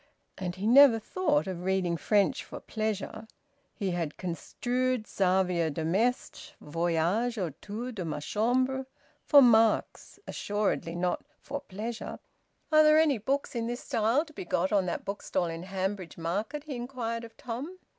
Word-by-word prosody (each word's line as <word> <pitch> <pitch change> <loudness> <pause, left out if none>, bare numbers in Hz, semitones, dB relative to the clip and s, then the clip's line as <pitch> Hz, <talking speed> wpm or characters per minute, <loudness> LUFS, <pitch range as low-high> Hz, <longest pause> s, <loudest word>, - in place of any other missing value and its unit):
And 180 -2 -4
he 190 +2 -5
never 255 +1 +8
thought 295 - 0
of 185 -3 -5
reading 185 -2 +1
French 200 +3 +2
for - - -8
pleasure. 220 0 -4 0.5
He 195 -5 -2
had 165 -4 -3
construed 245 +7 -2
Xavier 180 -4 +1
de 155 +2 -3
Maistre's 225 +9 -1
"Voyage 170 +9 0
autour 205 - -4
de 205 -6 -5
ma 155 -3 -3
Chambre" 255 - 0 0.4
for 285 -2 +7
marks, 225 -2 +3
assuredly 205 -5 -2
not 180 +1 -1 0.2
for 285 +1 -5
pleasure. 220 +4 -6 0.5
"Are 310 0 +7
there 305 0 +6
any 305 -6 +4
books 275 +6 -1
in 230 -2 -2
this 240 +1 -4
style 230 +8 +1
to 310 - -16
be - - -6
got 180 +1 0
on 195 -3 +2
that - - -3
bookstall 195 -2 -2
in 165 0 -4
Hanbridge 190 -1 -3
Market?" 205 - -3
he 300 -3 -6
inquired 240 -2 -4
of 225 -1 -12
Tom. 265 +9 -6
215 Hz, 155 wpm, -29 LUFS, 180-250 Hz, 0.5 s, never